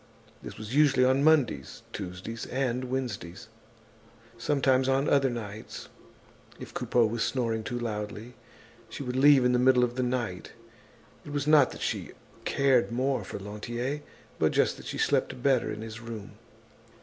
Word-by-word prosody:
This - - -9
was 110 +2 -7
usually 140 -3 +4
on 130 +2 +3
Mondays, 145 - +2
Tuesdays 95 +4 -6
and 130 -1 -1
Wednesdays. 120 -6 -5 0.9
Sometimes 130 +1 +2
on 135 +2 +2
other 135 -1 +3
nights, 110 -3 -7 0.7
if - - -9
Coupeau 120 -2 +2
was 115 +1 -1
snoring 115 -4 -1
too 120 - -4
loudly, 110 0 -5 0.6
she 125 - -6
would 125 -1 -4
leave 135 -1 +6
in 125 - +4
the 125 - +3
middle 125 0 +5
of 120 0 -1
the - - +1
night. 120 -7 -3 0.7
It 145 - -9
was 145 -1 -1
not 150 -3 +6
that - - -10
she - - -3 0.3
cared 135 -4 +2
more 130 -1 0
for - - -6
Lantier, 120 +8 -4 0.4
but - - +3
just - - +2
that - - -10
she - - -4
slept 125 - 0
better 135 -3 +2
in 105 - -6
his 115 +1 -8
room. 115 -3 -8
125 Hz, 160 wpm, -28 LUFS, 110-135 Hz, 0.9 s, leave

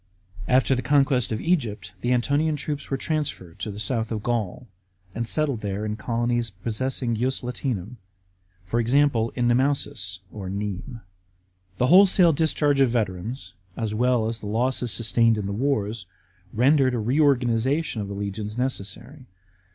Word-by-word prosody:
After 130 +1 +3
the 130 - 0
conquest 135 -4 +2
of 110 - -1
Egypt, 140 - -1
the 120 - 0
Antonian 145 +5 +2
troops 145 -1 -4
were 135 - -1
transferred 135 - -3
to 105 - -3
the 100 - -7
south 110 +2 -2
of 110 -2 -3
Gaul, 120 0 -2 0.5
and 115 +2 -3
settled 140 -4 -1
there 100 +1 -3
in 105 0 -2
colonies 120 +1 -1
possessing 115 +5 -2
ius 130 +3 -1
Latinum, 120 -3 -4 0.7
for 105 +6 -1
example, 120 -1 +2
in 120 -2 +1
Nemausus 120 -7 0 0.2
(Nimes). 100 +4 -5 0.8
The 125 - +2
wholesale 180 +2 +6
discharge 150 -2 +1
of 135 -2 +5
veterans, 110 -1 -3 0.2
as 110 -2 -2
well 120 0 +2
as 115 0 -3
the 105 - -7
losses 125 +3 0
sustained 115 0 +3
in 105 - -3
the 100 - -3
wars, 110 -5 -1 0.4
rendered 130 +2 +3
a - - -1
reorganisation 130 +1 +1
of 100 - -4
the 100 - -6
legions 105 +2 -4
necessary. 125 - -4
120 Hz, 150 wpm, -24 LUFS, 105-135 Hz, 0.8 s, wholesale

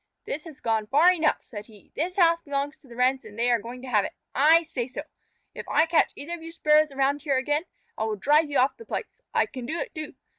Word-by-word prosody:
"This 300 +3 -5
has 300 -3 -12
gone 220 -2 0
far 310 +9 +5
enough," 320 -3 0
said 210 -2 -9
he. 215 -3 -18
"This 355 +4 -2
house 335 -2 +4
belongs 285 0 -3
to 280 - -22
the 235 - -12
Wrens 255 +2 +2
and 210 0 -12
they 240 +1 +2
are 240 - +3
going 245 +3 -9
to - - -7
have 215 -5 +3
it. - - -5 0.2
I 315 +5 +5
say 255 -7 -4
so. 265 - -6 0.5
If - - -8
I 315 - +4
catch 325 -1 +3
either 315 +4 -6
of 345 - -6
you 330 0 -8
Sparrows 305 -2 +3
around 275 +1 0
here 280 -3 +1
again, 295 +5 0 0.3
I 220 - 0
will 220 -1 -1
drive 295 +8 +3
you 285 - 0
off 260 +2 +2
the 460 - -11
place. - - -6
I - - +2
can 255 - -8
do 320 - -2
it, - - -4
too. 310 -2 -7
285 Hz, 260 wpm, -26 LUFS, 250-320 Hz, 0.5 s, far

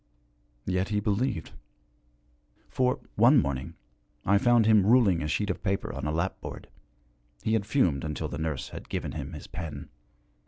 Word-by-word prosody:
Yet 95 +1 0
he 105 -1 +1
believed. 105 -2 -1 1.2
For, 125 -1 +1
one 120 +7 +6
morning, 70 - -2 0.5
I 100 +1 +4
found 120 0 +4
him 110 -2 +5
ruling 105 -5 +4
a 75 - -2
sheet 100 +6 0
of - - -6
paper 95 0 -2
on - - -4
a - - 0
lapboard 80 +2 -4 0.7
he 110 - +1
had 105 -3 0
fumed 90 - +2
until 75 -1 -3
the - - -6
nurse 80 -4 -3
had - - -9
given - - -3
him 75 +2 -6
his 75 - -8
pen. 80 -1 -7
95 Hz, 160 wpm, -28 LUFS, 80-110 Hz, 1.2 s, one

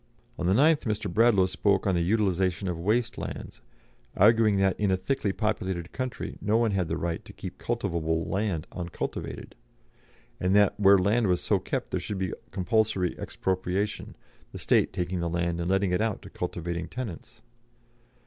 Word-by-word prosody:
On 90 - 0
the 95 - +4
9th 155 +4 +4
Mr. 110 -1 -2
Bradlaugh 110 -4 +5
spoke 95 +1 +1
on 95 - +2
the 85 - +1
utilisation 95 -1 +1
of 90 - -1
waste 115 +6 0
lands, - - -7 0.6
arguing 110 0 +5
that 95 -1 +2
in 105 -1 +2
a 95 - +2
thickly 105 -1 -1
populated 95 -5 -2
country 130 -2 -5
no 105 +2 +2
one 115 -2 +2
had 95 -4 0
the - - -2
right 85 -1 -3
to - - -12
keep - - -8
cultivable 80 -1 -1
land 95 -6 -1
uncultivated, 85 -2 -5 0.9
and 95 +2 +1
that 105 -1 +5
where 100 -1 +7
land 105 +4 +2
was 90 -1 +2
so - - +1
kept - - -4
there - - 0
should 105 - -4
be 95 -1 -2 0.2
compulsory 95 -1 +1
expropriation, 95 +2 -2 0.4
the - - -6
state - - +2
taking 90 -1 -2
the 85 0 -1
land 85 0 -1
and 85 - -2
letting 95 -1 +2
it 90 - +1
out 110 -2 -1
to - - -11
cultivating 85 -1 -4
tenants. 120 -9 -7
95 Hz, 175 wpm, -27 LUFS, 90-105 Hz, 0.9 s, where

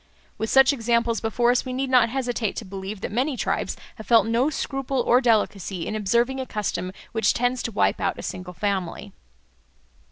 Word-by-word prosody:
With 220 - -2
such 270 +1 +6
examples 235 -2 +1
before 240 +2 +2
us 250 - +1
we 255 - -5
need 265 +1 -2
not 245 -3 +5
hesitate 245 -4 -2
to 225 - -5
believe 195 +1 -7
that - - -4
many 255 +5 0
tribes - - -2 0.2
have 220 - -10
felt 230 -2 +5
no 235 +5 +2
scruple 270 -3 -2
or 245 +1 +4
delicacy 205 -7 0
in 215 - -3
observing 235 +6 +1
a 260 - -4
custom 185 -3 -3 0.2
which 225 -1 +2
tends 245 +1 0
to 230 - -3
wipe 205 - +1
out - - 0
a - - -7
single 185 -1 -6
family. 195 -3 -3
235 Hz, 190 wpm, -24 LUFS, 205-250 Hz, 0.2 s, such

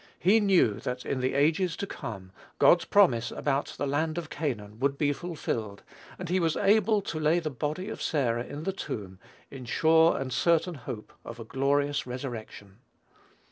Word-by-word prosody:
He 200 +5 +4
knew 185 - +3
that 125 0 -5
in 135 - -2
the 130 +1 -1
ages 160 +4 +2
to - - -3
come, 95 - -7 0.3
God's 175 - +5
promise 130 - +4
about 140 0 -2
the - - -1
land 155 +3 -1
of 165 -2 -5
Canaan 110 -8 -4
would 140 +1 0
be 145 -1 +1
fulfilled, 115 - -4 0.3
and 180 - -6
he 185 +2 +1
was 165 -3 +1
able 210 +1 +3
to 160 - -4
lay 155 +2 +3
the 160 -3 -2
body 150 +8 -3
of 220 - -6
Sarah 120 -6 0
in 145 +4 -7
the 195 - -2
tomb, 95 - -6 0.3
"in 130 -2 -8
sure 160 +6 +4
and 130 -2 -4
certain 170 +4 +2
hope 125 -6 -8
of 115 0 -9
a - - -5
glorious 140 +3 0
resurrection." 115 -5 -7
145 Hz, 180 wpm, -28 LUFS, 125-170 Hz, 0.3 s, God's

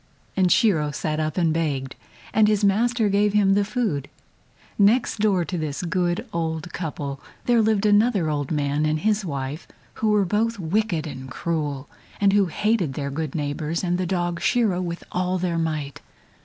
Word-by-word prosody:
and 185 -2 +3
Shiro 175 - +3
sat 155 +1 -2
up 155 +1 -2
and 165 -3 +2
begged, 140 -5 -2 0.4
and 215 0 +5
his 210 -1 +2
master 225 +3 +2
gave 205 +1 +2
him 200 -2 +4
the 200 +1 +3
food. 200 - -2 0.7
Next 215 +3 +3
door 195 -5 +2
to 180 -1 -3
this 155 +1 -3
good 175 0 0
old 165 0 -3
couple 145 -4 -4 0.3
there 240 -2 +4
lived 215 -1 +2
another 210 -3 +3
old 145 -2 -2
man 145 0 0
and 155 0 0
his 215 0 +1
wife 140 -1 -4 0.3
who 220 - +2
were 210 -2 +3
both 225 +5 0
wicked 180 -2 -1
and 130 -3 -7
cruel, 145 -1 -3 0.3
and 200 -1 +4
who 200 -2 +4
hated 190 - 0
their 140 -1 -3
good 155 0 -4
neighbors 150 +3 -2
and 175 0 0
the 185 - -1
dog 175 -2 -1
Shiro 195 -1 +2
with 170 -1 -4
all 180 +1 0
their 175 -2 -1
might. 155 -4 -3
175 Hz, 175 wpm, -24 LUFS, 155-205 Hz, 0.7 s, and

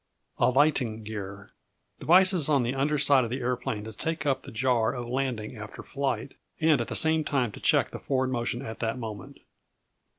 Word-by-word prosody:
Alighting 125 -5 +2
Gear 100 -1 -7 0.5
Devices 180 -2 +5
on 140 -4 +3
the 120 +2 -1
under 145 +3 0
side 140 -2 +4
of 115 - -3
the 130 +3 -3
aeroplane 120 -3 -2
to 110 0 -8
take 160 +4 -3
up 135 -2 +1
the - - -11
jar 120 -1 +1
of 120 -1 -5
landing 125 -3 -3
after 105 -1 -9
flight, 140 -1 -3 0.3
and 155 -5 +3
at 115 - -4
the - - -4
same 160 0 +4
time 130 -7 0
to - - -11
check - - +2
the - - -7
forward 130 -1 -1
motion 120 +1 -2
at 110 0 -7
that 115 +1 -2
moment. 110 -5 -8
125 Hz, 190 wpm, -27 LUFS, 110-140 Hz, 0.5 s, Devices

